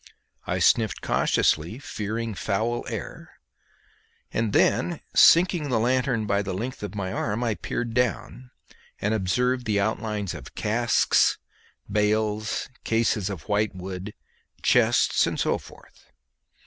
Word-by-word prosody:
I - - 0
sniffed 110 -2 +2
cautiously, 85 +9 +1
fearing 115 -4 -4
foul 110 +5 -2
air, - - -7 1.0
and 110 -1 0
then 175 - +2
sinking 170 -3 +5
the 120 - +1
lanthorn 125 -1 +1
by 100 -1 +1
the 100 -2 -4
length 120 +6 -5
of 105 -1 -6
my 95 -2 -3
arm 110 +2 -2
I 115 -2 +1
peered 115 +2 -4
down, 125 +1 -2 0.5
and 105 +2 0
observed 125 +5 0
the 105 -2 +1
outlines 105 -2 -2
of 80 -6 -10
casks, 110 +1 +2 0.5
bales, 105 +1 0 0.2
cases 115 -3 +1
of 95 -7 -6
white 105 0 0
wood, 95 +2 -7 0.5
chests, - - +3
and - - -3
so - - +1
forth. - - -18
110 Hz, 125 wpm, -25 LUFS, 100-120 Hz, 1.0 s, sinking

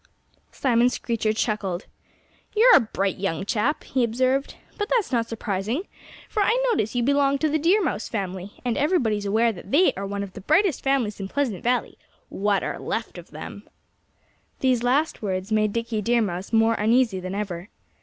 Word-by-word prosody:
Simon 245 -2 +2
Screecher 230 -3 -1
chuckled. 210 -5 -2 0.7
"You're 475 +4 +7
a - - +8
bright 195 -4 -2
young 190 -1 -2
chap," 235 +7 0
he 260 -2 0
observed. 255 +4 0 0.2
"But 415 - -1
that's 460 -10 +1
not 230 -2 +1
surprising, 225 - -2 0.4
for 425 - -1
I 445 +4 +3
notice 220 - 0
that - - -3
you 240 - +2
belong 280 +1 +3
to 310 - +1
the 310 +1 +1
Deer 370 +7 +3
Mouse 295 - -2
family, 190 -2 -4
and 240 -2 0
everybody's 235 - +1
aware 225 +3 +3
that 195 -2 -11
they 325 - +4
are 195 +1 -4
one 200 0 -3
of 195 -2 -8
the 200 - -9
brightest 315 - +2
families 260 -7 0
in 195 - -4
Pleasant 235 -6 -2
Valley 245 +1 0 0.3
what 200 0 0
are - - -3
left - - -4
of - - -13
them." - - -9 0.9
These 255 -3 +2
last 270 +6 +1
words 190 0 -3
made 215 -1 +2
Dickie 230 -1 -2
Deer 235 +2 +2
Mouse 185 0 -4
more 225 0 +4
uneasy 225 -2 +2
than 185 +1 -5
ever. 195 -2 -4
230 Hz, 185 wpm, -24 LUFS, 200-270 Hz, 0.9 s, a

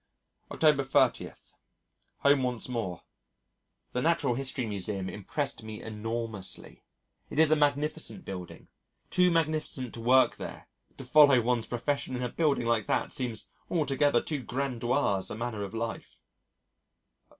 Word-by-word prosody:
October 150 -3 +3
30. 135 - +2 0.9
Home 140 -1 +5
once 125 -2 -2
more. 115 -8 -4 0.9
The 125 - 0
Natural 160 -5 +2
History 130 0 -1
Museum 100 -2 -3
impressed 135 +9 -3
me 110 -1 -8
enormously. 110 -2 -5 0.5
It - - -7
is 155 -1 +5
a - - +7
magnificent 150 +4 0
building 90 -2 -8 0.4
too 180 0 +4
magnificent 155 -6 0
to 115 - -7
work 130 +3 +4
there - - -8 0.3
to - - -7
follow 140 -1 +7
one's 120 -1 0
profession 130 +2 -2
in 125 - -3
a 125 - -1
building 145 -4 +1
like 115 -3 +1
that - - 0
seems 125 -6 -3 0.2
an 175 - 0
altogether 145 -3 +2
too 150 -4 -3
grandiose 125 -6 0
manner 110 -1 -4
of 100 +2 -5
life. 115 0 -5
125 Hz, 135 wpm, -29 LUFS, 115-145 Hz, 0.9 s, a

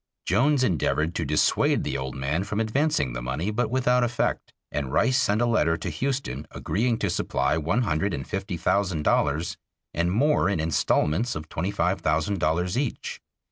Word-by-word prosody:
Jones 140 0 +3
endeavored 80 - +1
to 85 - -2
dissuade 75 +2 +2
the - - -3
old 65 0 -4
man 70 +7 -1
from 105 +1 -3
advancing 110 - +1
the - - -4
money, 70 - -2
but 115 +2 0
without 125 0 +2
effect, 120 0 -1 0.2
and 70 -3 -3
Rice 130 - +3
sent 105 -4 +1
a - - +3
letter 85 -9 +2
to - - -4
Houston 125 - -3
agreeing 115 +3 -1
to 100 - -1
supply 85 - 0
one 85 +10 0
hundred 100 0 0
and 70 -5 -4
fifty 95 -1 -3
thousand 95 -4 0
dollars 75 +4 +1 0.4
and 85 +2 0
more 135 - +3
in 100 - 0
instalments 80 +6 +1
of 75 0 -7
twenty 90 +4 -2
five 95 -2 0
thousand 80 +6 0
dollars 90 +8 0
each. 135 -4 -4
90 Hz, 180 wpm, -25 LUFS, 75-115 Hz, 0.4 s, Jones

